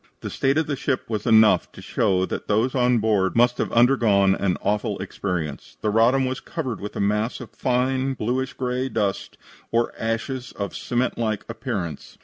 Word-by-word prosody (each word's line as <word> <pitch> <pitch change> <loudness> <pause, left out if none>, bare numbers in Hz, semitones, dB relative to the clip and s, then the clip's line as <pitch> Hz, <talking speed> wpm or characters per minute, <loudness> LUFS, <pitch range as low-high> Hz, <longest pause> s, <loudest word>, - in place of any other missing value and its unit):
The - - -5
state 135 +2 +1
of 160 - +2
the 145 - -2
ship 130 0 -2
was 105 -1 -2
enough 110 -1 +5
to - - -12
show 95 -1 +1
that - - -5
those 110 +5 +1
on 125 -2 +3
board 105 -4 +1
must 120 +1 +3
have - - -1
undergone 115 -6 +4
an 95 -2 0
awful 105 0 0
experience. 85 -7 -4
"The 105 - 0
Roddam 120 +5 +4
was 130 0 -2
covered 130 - -5
with 105 - -6
a - - -3
mass 105 +3 0
of - - -9
fine 130 +1 0
bluish 130 +4 -2
gray 125 0 -2
dust 100 -5 -2 0.3
or 115 0 +1
ashes 120 +3 -3
of 100 -3 -5
cement 125 0 -1
like 110 -3 -1
appearance. 110 - -5
115 Hz, 180 wpm, -23 LUFS, 105-130 Hz, 0.3 s, enough